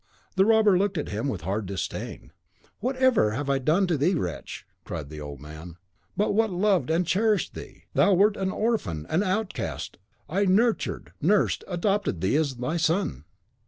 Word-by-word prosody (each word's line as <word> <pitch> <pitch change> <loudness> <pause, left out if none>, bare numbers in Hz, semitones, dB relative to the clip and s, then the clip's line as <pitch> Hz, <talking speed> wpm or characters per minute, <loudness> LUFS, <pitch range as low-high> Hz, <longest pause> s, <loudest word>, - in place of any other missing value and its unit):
The 190 0 +4
robber 215 -4 +5
looked 200 -2 0
at 150 - -3
him 110 +6 -2
with 100 - -3
a - - -9
hard 100 +2 -2
disdain. 95 -3 -5 0.5
"What 255 +5 -1
have 260 -2 +4
I 105 - +4
ever 140 -1 0
done 155 +9 +2
to 170 -5 0
thee, 180 +7 +3
wretch?" 90 - -4 0.2
cried 75 -4 -6
the 75 -1 -8
old 70 -2 -7
man, 80 +4 -10 0.4
"what 205 +1 +1
but 225 0 +3
loved 190 -1 +1
and 165 +3 +2
cherished 205 +4 +1
thee? - - -10
Thou 200 - +4
wert 205 +3 +4
an 190 -2 -1
orphan, 190 - -1
an 170 - +2
outcast. 205 - -3 0.3
I 195 +7 +1
nurtured, 220 +5 +1
nursed, 195 +6 +2
adopted 195 - 0
thee 95 +9 +1
as 145 -4 0
my 125 +7 -2
son. 160 - 0
175 Hz, 180 wpm, -26 LUFS, -, 0.5 s, robber